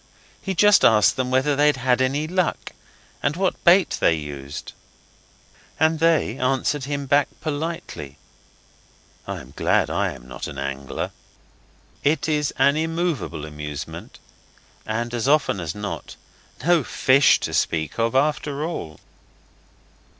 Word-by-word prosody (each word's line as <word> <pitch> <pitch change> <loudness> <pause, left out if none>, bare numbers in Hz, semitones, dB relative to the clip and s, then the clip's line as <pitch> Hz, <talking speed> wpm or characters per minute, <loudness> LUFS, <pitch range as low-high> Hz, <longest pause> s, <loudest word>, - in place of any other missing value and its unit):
He 190 -1 -3
just 205 +3 +5
asked 105 -2 +5
whether 130 +3 +1
they'd 145 0 +3
had 125 0 +1
any 140 +4 +1
luck, 180 +2 -1 0.5
and 145 +1 0
what 185 +1 -1
bait 180 +1 +4
they 85 - +3
used. 70 -2 -7 1.1
And 160 0 +3
they 160 -6 +2
answered 135 +2 0
him 140 0 -3
back 140 +2 +3
politely. 150 - -5 1.1
I - - -4
am 65 0 -15
glad - - +1
I - - 0
am - - -14
not - - -6
an 70 - -8
angler. 70 0 -4 0.9
It 155 +3 +1
is 150 -2 0
an 140 +2 +4
immovable 160 - -2
amusement, 75 -1 -7 0.7
and, 115 +2 -2
as 120 +1 -1
often 140 -8 +2
as 85 -2 -4
not, 105 -1 -6 0.5
no 170 -3 +4
fish 130 +2 +4
to - - -3
speak 80 +4 -1
of 115 +2 +1
after 145 +1 0
all. 80 - -6
135 Hz, 130 wpm, -23 LUFS, -, 1.1 s, just